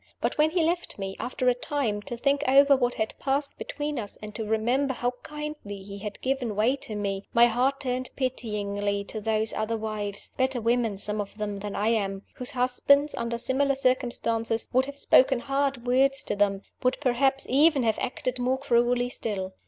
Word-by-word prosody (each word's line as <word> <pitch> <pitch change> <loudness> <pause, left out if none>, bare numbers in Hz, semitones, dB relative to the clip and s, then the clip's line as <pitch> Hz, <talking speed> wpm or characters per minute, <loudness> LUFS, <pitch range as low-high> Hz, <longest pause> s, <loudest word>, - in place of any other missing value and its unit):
But - - -1
when 305 +1 +5
he 335 0 +1
left 345 +2 -1
me, 195 -1 -4
after 255 +1 -2
a 250 - +6
time, 245 -5 -2
to 240 - -4
think 280 +3 +1
over 280 +1 +6
what 245 -2 0
had 220 0 -2
passed 280 +1 0
between 295 -2 -3
us, 205 -3 -5
and 210 0 -8
to 220 - -4
remember 240 +6 0
how 245 0 0
kindly 300 -10 -7
he 200 +1 -8
had 210 0 -6
given 255 -5 -1
way 225 +6 +3
to 220 - -4
me, 200 -1 -3
my 235 0 +8
heart 250 +4 +1
turned 255 -1 -2
pityingly 205 -5 -2
to 215 +2 -6
those 220 0 +1
other 220 +1 -1
wives 210 -2 -4
(better 260 -1 +1
women, 230 -2 +1
some 210 +1 -1
of 205 +1 -9
them, 205 -2 -3
than 205 0 -5
I 210 +2 +1
am), 200 -3 -1
whose 250 - -4
husbands, 270 +3 +3
under 235 0 -2
similar 270 +3 +1
circumstances, 240 -3 +1
would 260 +2 +3
have 280 0 -7
spoken 265 -2 +4
hard 275 -2 -1
words 270 +2 +3
to - - -2
them 200 -1 +1 0.2
would 255 0 +1
perhaps 270 0 +1
even 285 +1 +4
have 220 -1 +1
acted 255 0 -3
more 255 +2 +1
cruelly 245 -2 +2
still. 190 -6 -3
245 Hz, 190 wpm, -27 LUFS, 215-270 Hz, 0.2 s, my